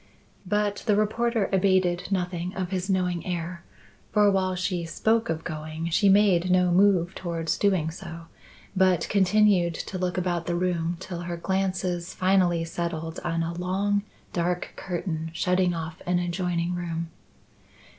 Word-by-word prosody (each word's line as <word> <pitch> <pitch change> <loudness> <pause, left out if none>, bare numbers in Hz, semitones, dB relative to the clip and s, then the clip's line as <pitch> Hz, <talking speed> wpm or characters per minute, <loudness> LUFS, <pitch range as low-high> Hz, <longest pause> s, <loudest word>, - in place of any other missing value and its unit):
But 205 +1 +1
the 210 - +4
reporter 220 +1 +1
abated 185 -2 +2
nothing 180 -2 -2
of 185 -1 -3
his 190 0 -2
knowing 180 -3 0
air, 170 0 -4 0.5
for 210 -1 +5
while 185 -1 +1
she 180 -1 -1
spoke 220 +7 +1
of 165 0 -2
going, 155 +1 -5
she 200 +4 +4
made 190 -3 +4
no 180 -1 +4
move 185 -1 +4
towards 165 -3 -2
doing 185 -6 +1
so, 170 -1 -8 0.5
but 185 -3 +3
continued 195 -3 +3
to 185 - -5
look 180 0 -1
about 175 -2 -1
the 175 - 0
room 175 -1 0
till 185 -2 -6
her 175 0 -4
glances 185 -1 -1
finally 185 -3 +2
settled 165 -1 -4
on 165 -1 0
a 165 +1 -3
long 195 +4 0 0.3
dark 175 0 -1
curtain 170 -3 -3
shutting 180 0 +2
off 160 -1 -6
an 180 0 +2
adjoining 175 0 -1
room. 170 -1 -4
180 Hz, 145 wpm, -26 LUFS, 170-190 Hz, 0.5 s, for